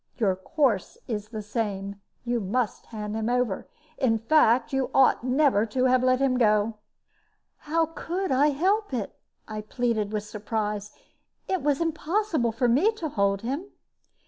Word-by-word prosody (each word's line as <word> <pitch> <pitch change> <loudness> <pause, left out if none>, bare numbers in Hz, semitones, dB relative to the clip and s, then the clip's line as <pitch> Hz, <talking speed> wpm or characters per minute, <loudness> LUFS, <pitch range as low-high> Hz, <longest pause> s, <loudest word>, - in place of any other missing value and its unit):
Your 200 -6 +2
course 220 - 0
is 215 -3 -4
the 215 -2 -6
same; 200 -2 -3 0.2
you 240 0 0
must 220 +3 -2
hand 210 -1 -5
him 220 +1 -1
over. 245 -5 0 0.3
In 240 -5 +3
fact, 235 0 +3
you 270 -1 0
ought 265 -3 +4
never 255 -4 +3
to 255 +4 -1
have 255 0 +4
let 255 0 +3
him 260 -2 +2
go." 215 -1 +2 0.8
"How 325 +2 0
could 345 +3 -4
I 270 +3 +4
help 370 +4 +1
it?" 215 -5 -3 0.3
I 215 -1 -5
pleaded, 220 -2 -1
with 210 -1 -2
surprise. 210 -1 -3 0.6
"It 375 -2 0
was 285 -1 +1
impossible 325 - 0
for 245 +3 0
me 290 - +4
to 335 -8 -4
hold 200 -5 +1
him." 275 +10 -3
240 Hz, 155 wpm, -26 LUFS, 210-285 Hz, 0.8 s, ought